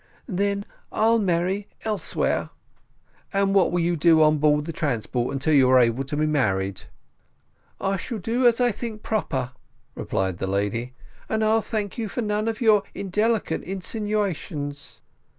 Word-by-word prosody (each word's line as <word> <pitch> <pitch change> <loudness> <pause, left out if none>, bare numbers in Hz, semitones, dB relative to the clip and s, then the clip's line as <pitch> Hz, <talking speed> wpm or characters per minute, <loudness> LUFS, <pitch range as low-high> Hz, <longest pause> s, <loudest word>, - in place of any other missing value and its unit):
"Then 200 -1 -1 0.3
I'll 230 +1 +3
marry 190 +1 0 0.2
elsewhere." 215 -2 -1 0.8
"And 195 0 +2
what 195 -3 +4
will 175 0 +1
you 170 +1 +1
do 160 0 +5
on 155 0 +4
board 150 0 +3
of - - -9
the 165 - -5
transport 125 -4 -1
until 140 +3 0
you 135 -3 +5
are 130 - +6
able 120 +2 +2
to 145 +2 -4
be 155 - +2
married?" 100 -11 0 1.0
"I 195 0 0
shall 230 +6 -5
do 235 +6 +1
as 235 0 +3
I 245 -1 +3
think 220 0 -6
proper," 130 - -1 0.4
replied 95 -2 -2
the 95 - -2
lady; 105 +6 -2 0.3
"and 220 0 0
I'll 220 +1 +3
thank 210 -1 -3
you 220 -2 -2
for 245 - -3
none 210 +1 -1
of 225 0 -2
your 215 -3 +5
indelicate 205 -1 0
insinuations." 190 -7 -3
180 Hz, 160 wpm, -24 LUFS, 140-215 Hz, 1.0 s, are